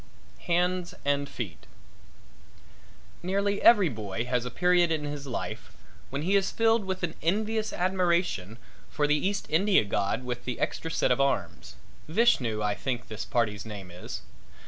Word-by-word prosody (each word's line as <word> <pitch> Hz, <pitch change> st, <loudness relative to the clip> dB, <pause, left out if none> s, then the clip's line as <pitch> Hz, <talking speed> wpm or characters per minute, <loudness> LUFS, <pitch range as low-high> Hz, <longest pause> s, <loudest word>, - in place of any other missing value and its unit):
HANDS 180 Hz, +1 st, +1 dB
AND 140 Hz, 0 st, +1 dB
FEET 100 Hz, -10 st, -7 dB, 1.5 s
Nearly 200 Hz, +3 st, 0 dB
every 205 Hz, -6 st, +7 dB
boy 110 Hz, -3 st, -4 dB
has 125 Hz, -1 st, 0 dB
a -, -, -2 dB
period 175 Hz, +4 st, +3 dB
in 155 Hz, -2 st, 0 dB
his 145 Hz, -1 st, -5 dB
life 125 Hz, -, -5 dB, 0.4 s
when 140 Hz, +2 st, -3 dB
he 190 Hz, +4 st, +2 dB
is 195 Hz, -1 st, +3 dB
filled 225 Hz, -2 st, +2 dB
with 190 Hz, -1 st, -3 dB
an 165 Hz, -2 st, -1 dB
envious 215 Hz, +5 st, 0 dB
admiration 175 Hz, -, 0 dB, 0.3 s
for 150 Hz, -, 0 dB
the 145 Hz, -, +3 dB
East 200 Hz, 0 st, -2 dB
India 190 Hz, -, +4 dB
god 100 Hz, +4 st, -1 dB
with 125 Hz, -1 st, -5 dB
the 125 Hz, -, -3 dB
extra 165 Hz, -, -2 dB
set 140 Hz, -, +1 dB
of 125 Hz, -, +3 dB
arms 95 Hz, -, -1 dB, 0.3 s
Vishnu, 140 Hz, -, +2 dB
I 105 Hz, 0 st, +1 dB
think 120 Hz, +3 st, -4 dB
this 110 Hz, 0 st, -5 dB
party's 105 Hz, -4 st, 0 dB
name 100 Hz, -5 st, -8 dB
is. 90 Hz, +1 st, -7 dB
150 Hz, 155 wpm, -28 LUFS, 115-185 Hz, 1.5 s, every